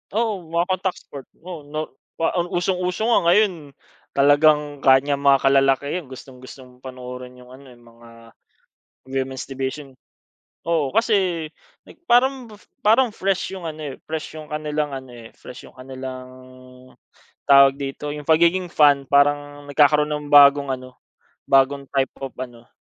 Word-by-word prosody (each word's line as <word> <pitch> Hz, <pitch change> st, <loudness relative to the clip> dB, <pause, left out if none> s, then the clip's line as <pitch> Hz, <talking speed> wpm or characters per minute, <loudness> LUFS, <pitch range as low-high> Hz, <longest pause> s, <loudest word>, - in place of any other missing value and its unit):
Oo, 220 Hz, -3 st, 0 dB
mga 170 Hz, +2 st, 0 dB
contact 185 Hz, 0 st, -2 dB
sport. 140 Hz, -2 st, -11 dB, 0.2 s
Oo, 170 Hz, -5 st, -9 dB
no 155 Hz, +1 st, -5 dB, 0.7 s
usong-uso 180 Hz, +3 st, -2 dB
nga -, -, +5 dB
ngayon 205 Hz, +1 st, +4 dB, 0.6 s
talagang 145 Hz, 0 st, +3 dB
ganyang 140 Hz, +1 st, +3 dB
mga 140 Hz, -1 st, +5 dB
kalalakihan 135 Hz, +4 st, +1 dB
gustong-gustong 130 Hz, -1 st, -13 dB
panoorin 125 Hz, -1 st, -9 dB
yung 125 Hz, 0 st, -16 dB
ano, 135 Hz, 0 st, -15 dB
eh, 125 Hz, -, -16 dB
yung 120 Hz, -, -22 dB
mga 115 Hz, 0 st, -18 dB, 1.0 s
women's 130 Hz, -1 st, -4 dB
division 135 Hz, +1 st, -6 dB, 0.7 s
Oo 165 Hz, -4 st, 0 dB
kasi 190 Hz, -8 st, +1 dB, 0.6 s
parang, 250 Hz, 0 st, +2 dB, 0.3 s
parang 230 Hz, +4 st, +3 dB
fresh 195 Hz, 0 st, -2 dB
yung 180 Hz, -3 st, -7 dB
ano, 155 Hz, -3 st, -7 dB
eh, -, -, -10 dB
fresh 155 Hz, -1 st, -5 dB
yung 155 Hz, -, -12 dB
kanilang 150 Hz, 0 st, -3 dB
ano 130 Hz, -1 st, -12 dB
,eh, 115 Hz, -1 st, -12 dB
fresh 125 Hz, -, -12 dB
yung -, -, -24 dB
kanilang, 130 Hz, 0 st, -8 dB, 1.2 s
tawag 140 Hz, -1 st, +6 dB
dito 140 Hz, +1 st, -6 dB
yung 150 Hz, -1 st, -9 dB
pagiging 170 Hz, +3 st, +3 dB
fan 145 Hz, -2 st, +4 dB
parang 145 Hz, 0 st, +1 dB
nagkakaroon 150 Hz, +1 st, +3 dB
ng 150 Hz, -1 st, -4 dB
bagong 140 Hz, -1 st, +6 dB
ano, 130 Hz, 0 st, -10 dB, 0.5 s
bagong 135 Hz, +1 st, +3 dB
type 135 Hz, -1 st, -1 dB
of 135 Hz, -, -4 dB
ano 120 Hz, -2 st, -10 dB
145 Hz, 135 wpm, -21 LUFS, 135-160 Hz, 1.2 s, tawag